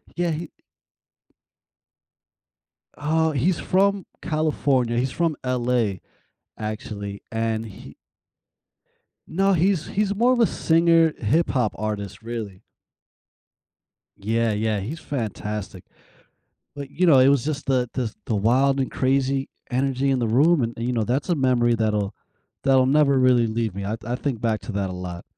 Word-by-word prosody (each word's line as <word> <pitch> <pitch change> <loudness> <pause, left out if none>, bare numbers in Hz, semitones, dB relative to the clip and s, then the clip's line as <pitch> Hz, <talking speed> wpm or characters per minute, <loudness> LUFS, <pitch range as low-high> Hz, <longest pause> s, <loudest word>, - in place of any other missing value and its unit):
Yeah, 175 -1 0
he 160 +1 -4 2.5
uh, 160 +2 +1
he's 160 +6 +1
from 195 0 +1 0.2
California. 140 -6 0
He's 125 +2 0
from 165 -1 0
LA, 120 -5 0 0.6
actually, 105 -2 -6
and 115 0 -1
he 105 - -12 1.3
No, 195 +4 +2
he's 180 -1 +1
he's 205 0 -1
more 240 +4 +3
of 250 - +2
a 230 - +5
singer, 165 0 +3
hip 150 +10 +1
hop 125 -6 0
artist, 100 -2 -4
really. 110 -5 -6 1.6
Yeah, 115 +2 0
yeah, 105 0 0
he's 135 +12 -5
fantastic. 105 - -5 0.9
But, 140 -1 -7
you 180 +5 0
know, 150 -6 +6
it 130 - +6
was 140 -3 +3
just 150 -2 -3
the 125 -3 +1
the 130 - -1
s 110 - -5
the 110 - -1
wild 130 +6 +2
and 130 - -1
crazy 135 +1 0 0.2
energy 135 +1 0
in 130 - +2
the 120 - 0
room 145 +8 +4
and 115 0 -2
and, 115 - -3
you 125 - 0
know, 115 -2 0
that's 130 - -1
a 175 - +3
memory 125 -4 +2
that'll 105 -3 -1 0.5
that'll 130 -1 +4
never 140 0 +3
really 125 -2 +4
leave 110 -3 -2
me, 100 0 -4
I 110 +3 -2
I 120 +2 -2
think 130 -4 -3
back 110 -2 0
to - - -7
that 100 -1 -1
a - - -5
lot. 90 -1 -6
125 Hz, 155 wpm, -23 LUFS, 110-150 Hz, 2.5 s, know